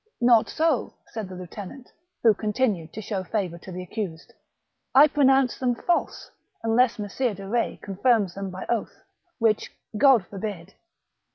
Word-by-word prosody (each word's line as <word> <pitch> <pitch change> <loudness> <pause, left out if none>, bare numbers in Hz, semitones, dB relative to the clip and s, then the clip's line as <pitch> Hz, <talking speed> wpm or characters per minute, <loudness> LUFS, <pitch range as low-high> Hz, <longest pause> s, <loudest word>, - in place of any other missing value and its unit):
" - - -55
Not 225 - +4
so," 315 -6 0 0.2
said 220 -4 -5
the 185 - -8
lieutenant, 200 +8 -9 0.4
who 225 -2 +7
continued 210 -6 -1
to 215 - -6
show 195 -2 -3
favour 180 -3 -3
to 185 - -10
the 180 0 -5
accused; 180 -3 -6 0.6
"I 285 +3 +9
pronounce 270 -3 +3
them 245 -2 +1
false, 345 +8 -1 0.3
unless 230 +2 +3
Messire 210 +2 -2
de 195 +1 -9
Retz 235 +3 -1
confirms 200 -1 +1
them 195 0 -5
by 185 0 -7
oath, 235 -3 -3 0.3
which 225 -3 +1 0.2
God 255 -4 +5
forbid 195 -2 -6
215 Hz, 155 wpm, -25 LUFS, 190-245 Hz, 0.6 s, I